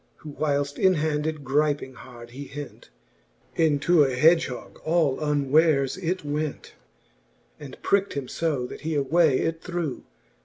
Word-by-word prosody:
Who 155 - -10
whileft 145 -1 -1
in 190 -1 +4
hand 150 -1 -1
it 155 -2 -4
gryping 145 0 0
hard 120 -1 -12
he 140 +3 -8
hent, 145 - -9 0.7
Into 160 0 +3
a 135 -2 0
hedgehogge 155 -2 +2
all 160 -4 +1
unwares 145 -1 +2
it 175 -1 -2
went, 150 0 -4 0.9
And 140 -3 -10
prickt 200 0 +1
him 140 -2 -4
^o^ 140 -3 -2
that - - -10
he 160 0 -2
away 145 0 +3
it 165 0 -2
threw.. 175 -6 -4
150 Hz, 145 wpm, -25 LUFS, 140-160 Hz, 0.9 s, in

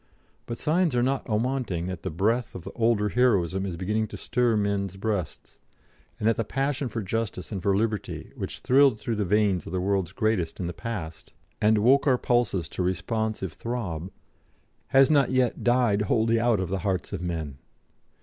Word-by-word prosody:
But 120 - -4
signs 165 -2 +1
are 120 - +3
not 135 +1 -1
awanting 115 -6 -1
that 95 -2 -5
the - - -3
breath 110 +9 0
of 90 - -7
the - - -7
older 110 -3 +1
heroism 100 -6 +2
is 85 -3 -5
beginning 105 +5 -1
to - - -8
stir 120 -2 +1
men's 100 -2 -1
breasts, 100 -5 -4 0.6
and 105 - -1
that 115 - +3
the 115 - +1
passion 135 +3 -1
for 115 -2 -4
justice 110 -1 -3
and 100 -3 -3
for 100 +1 +2
liberty, 105 -2 -2
which - - -6
thrilled 135 -3 +4
through 110 +1 -3
the 105 - 0
veins 100 -3 +1
of 80 - -7
the 90 - 0
world's 95 -2 0
greatest 110 -6 -1
in 90 - -2
the 85 - -3
past, 85 -7 -6 0.3
and 110 +1 +4
woke 135 +7 +4
our 130 -2 +4
pulses 120 -8 +1
to - - -4
responsive 95 +2 -2
throb, 95 -8 -4 0.8
has 135 +1 +5
not 140 -4 +4
yet 130 -2 +1
died 120 -4 +3
wholly 115 +2 +2
out 115 -3 +2
of 95 -3 -2
the 95 +1 -1
hearts 95 +1 -2
of - - -3
men. 80 -6 -4
105 Hz, 190 wpm, -26 LUFS, 95-120 Hz, 0.8 s, has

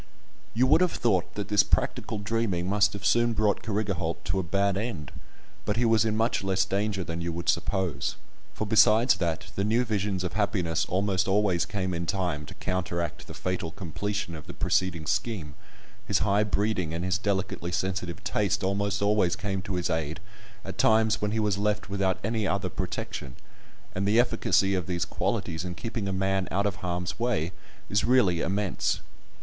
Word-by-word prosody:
You 125 +3 +4
would 140 +6 +5
have 180 -2 +3
thought 95 -7 +1
that 105 -1 -4
this 105 -1 +6
practical 110 - 0
dreaming 100 -4 -1
must 105 +1 +3
have 100 -1 -6
soon 120 +3 +3
brought 105 -2 +1
Carrigaholt 100 -6 -2
to 95 - 0
a - - +2
bad 100 +3 +1
end, 100 - -4 0.5
but 105 - -1
he 120 - +3
was 115 -1 +4
in 110 -1 0
much 115 -2 +1
less 95 0 +2
danger 100 0 -1
than 85 0 -4
you 85 0 -2
would 85 +1 -5
suppose; 90 0 0 0.4
for 110 - -3
besides 110 +1 +5
that 85 -3 -2
the 100 - 0
new 115 +4 +2
visions 100 -4 -1
of 90 - -3
happiness 90 -5 0
almost 95 0 +1
always 95 -3 +2
came 95 -3 -2
in 85 0 -3
time 90 -7 -1
to - - -10
counteract 85 -2 -3
the - - -9
fatal 90 -3 -2
completion 100 +2 -4
of 80 +1 -9
the 90 - -8
preceding 95 -4 0
scheme, 80 -3 -2 0.5
his - - +3
high 105 +1 +3
breeding 100 -4 0
and 85 +2 -2
his 90 -2 +1
delicately 95 -3 -1
sensitive 90 -1 -2
taste - - 0
almost 100 +1 0
always 100 -3 +3
came 100 -3 -2
to 95 0 -4
his 90 -1 0
aid 80 0 -2 0.5
at 95 -1 -7
times 110 -1 +4
when 105 - +1
he 110 +2 -1
was 105 -2 +1
left 105 -1 -1
without 95 -2 +1
any 110 -1 0
other 95 -1 0
protection; 65 -6 -5 0.6
and 95 +2 -1
the 110 +3 +4
efficacy 115 -5 +3
of 90 -4 -1
these 90 -2 -1
qualities 80 +1 -2
in 90 -1 -5
keeping 115 0 -4
a - - -1
man 95 0 0
out 100 +2 0
of 105 0 -1
harm's 90 +1 -3
way 110 -9 0 0.4
is 100 0 +1
really 110 -9 +4
immense. 100 -1 0
95 Hz, 185 wpm, -27 LUFS, 90-105 Hz, 0.6 s, this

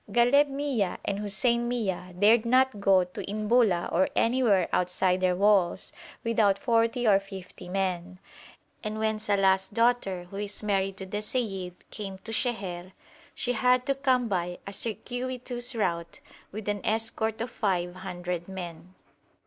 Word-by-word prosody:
Ghaleb 245 +6 +5
Mia 275 -9 -1
and 200 0 -1
Hussein 235 +4 +1
Mia 195 -7 -2
dared 215 +4 +5
not 255 -1 +3
go 195 -2 +4
to 180 0 -7
Inbula 210 -3 +2
or 185 +3 +3
anywhere 230 -7 +3
outside 180 +1 +1
their 180 -1 +2
walls 195 -2 +2 0.3
without 220 -4 +3
forty 230 +1 +1
or 195 -2 +6
fifty 190 -2 -10
men, 185 -1 -2 0.7
and 215 0 -3
when 220 0 0
Salàh's 195 -2 +2
daughter, 230 -5 +1
who 195 - -7
is 205 +1 -5
married 195 -2 0
to 190 - -5
the 205 +2 -4
seyyid, 195 -6 -3 0.2
came 195 -3 -6
to 225 - -7
Sheher, 190 -7 -2 0.4
she 245 - -1
had 250 +1 +3
to 275 - +2
come 260 -3 +1
by 180 -3 -2
a 200 - -7
circuitous 245 +2 -4
route, 170 -6 -2 0.3
with 215 +1 -7
an 205 -1 -1
escort 220 0 -1
of 230 +2 -3
five 180 -5 -1
hundred 180 -2 -5
men. 180 -1 -8
205 Hz, 150 wpm, -28 LUFS, 185-235 Hz, 0.7 s, or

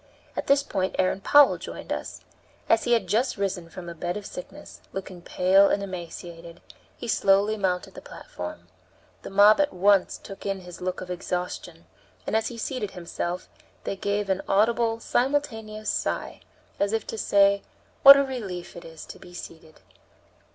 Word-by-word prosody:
At - - -4
this 280 0 +4
point 190 -8 -2
Aaron 185 +1 +1
Powell 290 +6 +6
joined - - -6
us. - - -6 0.5
As 225 - +3
he 240 - +3
had 230 -5 +2
just 225 +8 0
risen 190 -4 -3
from 180 0 -9
a 170 - -6
bed 175 +3 -3
of 205 - -8
sickness, 180 - -10
looking 185 -2 -7
pale 190 +3 +4
and 200 - 0
emaciated, 170 -2 -8 0.4
he 240 - -7
slowly 200 0 +3
mounted 185 -3 -2
the - - -10
platform. 90 0 -9 0.5
The - - -8
mob 205 +6 +6
at 290 - +1
once 195 +1 +3
took 195 - -11
in 195 -1 -3
his 180 -1 -11
look 185 0 -3
of 180 - -7
exhaustion, 180 -1 -5 0.4
and, - - -2
as 220 0 +1
he 240 - -7
seated 230 -2 -3
himself, 175 0 -5 0.4
they - - -3
gave 200 +1 -1
an 190 0 0
audible 225 +3 +2
simultaneous 225 -5 -1
sigh, - - -3 0.4
as 200 +1 +1
if 225 -1 -1
to 225 - -6
say, 200 0 +4 0.4
what 275 0 +11
a 280 - +3
relief 205 -10 -6
it 170 - -9
is 160 -1 -11
to - - -11
be 175 - -13
seated! 160 -2 -11
195 Hz, 170 wpm, -26 LUFS, 180-220 Hz, 0.5 s, what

